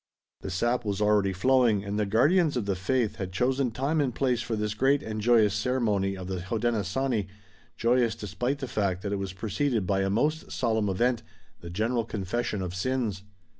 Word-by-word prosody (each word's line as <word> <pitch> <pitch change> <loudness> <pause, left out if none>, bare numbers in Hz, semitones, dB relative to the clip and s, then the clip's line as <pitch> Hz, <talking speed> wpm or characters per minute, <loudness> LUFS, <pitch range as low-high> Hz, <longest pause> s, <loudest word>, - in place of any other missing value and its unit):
The - - -6
sap 120 +7 0
was 100 -2 -2
already 105 -2 +3
flowing 115 0 +3
and 100 +1 -3
the 105 - 0
guardians 150 - +3
of 115 - -1
the 100 -1 0
faith 110 +3 0
had 95 -4 -4
chosen 130 +6 +1
time 140 +7 0
and 130 -4 -1
place 125 -3 +1
for 115 -1 -2
this 105 -1 -2
great 135 +6 +2
and 110 -1 -4
joyous 110 -3 +4
ceremony 105 -4 0
of 95 - -7
the 95 -2 -3
Hodenosaunee, 110 +2 -1 0.5
joyous 120 -1 +2
despite 125 +6 -2
the 135 -2 -5
fact 95 -5 -1
that 100 -1 -2
it - - 0
was 95 -1 -4
preceded 110 +3 -1
by 95 +1 +1
a 95 - 0
most 150 +10 0
solemn 110 -4 0
event, 120 +5 +1 0.4
the 85 - -9
general 115 +6 0
confession 105 -1 -3
of 90 -1 -4
sins. 110 -1 -1
110 Hz, 190 wpm, -27 LUFS, 100-125 Hz, 0.5 s, joyous